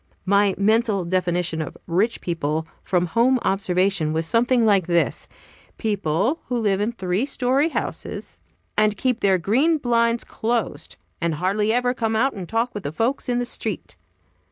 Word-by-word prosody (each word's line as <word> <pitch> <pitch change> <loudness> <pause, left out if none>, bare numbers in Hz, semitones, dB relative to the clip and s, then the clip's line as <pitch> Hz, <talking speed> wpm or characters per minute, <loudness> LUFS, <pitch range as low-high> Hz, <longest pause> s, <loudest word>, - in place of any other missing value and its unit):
My 200 0 +3
mental 215 -2 +2
definition 175 -2 0
of 155 - -6
"rich 200 +7 0
people," 160 -2 -2 0.2
from 180 -1 +1
home 235 +9 +3
observation, 190 -4 +1
was 160 +1 0
something 235 +5 +3
like 195 -5 +3
this: 170 -1 0 0.5
People 205 - 0
who 250 - -1
live 205 -3 +1
in 215 +3 0
three 190 0 -1
story 270 +3 +1
houses, - - -5 0.3
and 215 -1 +2
keep 250 0 0
their 195 -2 +3
green 260 - +2
blinds 235 -3 +1
closed, 220 -10 -3 0.3
and 170 -2 0
hardly 200 +6 0
ever 245 +1 +1
come 225 -3 -1
out 265 +5 +2
and 185 -4 -7
talk 230 +2 0
with 205 - -5
the 145 - -4
folks 235 - -1
in 245 - +1
the 245 - 0
street. 245 - -4
205 Hz, 160 wpm, -23 LUFS, 180-235 Hz, 0.5 s, My